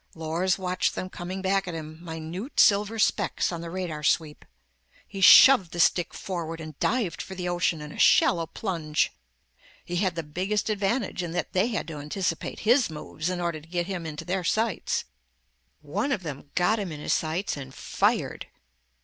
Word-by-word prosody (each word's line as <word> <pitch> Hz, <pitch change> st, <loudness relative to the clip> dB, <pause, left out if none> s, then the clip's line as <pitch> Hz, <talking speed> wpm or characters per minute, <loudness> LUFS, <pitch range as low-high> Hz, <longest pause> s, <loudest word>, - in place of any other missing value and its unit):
Lors 165 Hz, +3 st, 0 dB
watched 185 Hz, -1 st, -1 dB
them 185 Hz, -, -5 dB
coming 185 Hz, +2 st, -6 dB
back 195 Hz, 0 st, +1 dB
at 175 Hz, -, -4 dB
him, 155 Hz, +1 st, -8 dB
minute 165 Hz, -, -5 dB
silver 210 Hz, +1 st, +4 dB
specks 215 Hz, -, +1 dB
on 170 Hz, -1 st, -5 dB
the 170 Hz, -, -6 dB
radar 170 Hz, -4 st, -4 dB
sweep. 150 Hz, 0 st, 0 dB, 0.6 s
He 195 Hz, -2 st, -7 dB
shoved 195 Hz, -4 st, +8 dB
the 175 Hz, -, -5 dB
stick 175 Hz, 0 st, +3 dB
forward 165 Hz, -3 st, -4 dB
and 155 Hz, -2 st, -9 dB
dived 225 Hz, -8 st, 0 dB
for 190 Hz, -, -8 dB
the 180 Hz, -1 st, -4 dB
ocean 175 Hz, -2 st, 0 dB
in 150 Hz, 0 st, -8 dB
a -, -, -10 dB
shallow 165 Hz, -2 st, +4 dB
plunge. 165 Hz, -5 st, -1 dB, 0.7 s
He 175 Hz, -, -3 dB
had 185 Hz, -2 st, 0 dB
the 165 Hz, -, -3 dB
biggest 190 Hz, +8 st, -1 dB
advantage, 205 Hz, 0 st, -1 dB
in 170 Hz, -2 st, -4 dB
that 175 Hz, -, -3 dB
they 190 Hz, +4 st, +3 dB
had 225 Hz, -3 st, -3 dB
to 155 Hz, -, -6 dB
anticipate 165 Hz, +3 st, -3 dB
his 240 Hz, +1 st, +4 dB
moves, 155 Hz, +1 st, -5 dB
in 180 Hz, -1 st, -2 dB
order 170 Hz, -3 st, -2 dB
to 155 Hz, -, -18 dB
get 175 Hz, 0 st, -1 dB
him 180 Hz, -3 st, -4 dB
into 150 Hz, -1 st, -6 dB
their 185 Hz, 0 st, -1 dB
sights. 220 Hz, +2 st, 0 dB, 0.8 s
One 200 Hz, -, -2 dB
of 210 Hz, -8 st, -1 dB
them 145 Hz, -3 st, -7 dB
got 210 Hz, +5 st, +2 dB
him 195 Hz, -4 st, -4 dB
in 150 Hz, -, -7 dB
his -, -, 0 dB
sights 165 Hz, +5 st, -1 dB
and 135 Hz, -2 st, -8 dB
fired. -, -, -1 dB
175 Hz, 185 wpm, -26 LUFS, 160-195 Hz, 0.8 s, shoved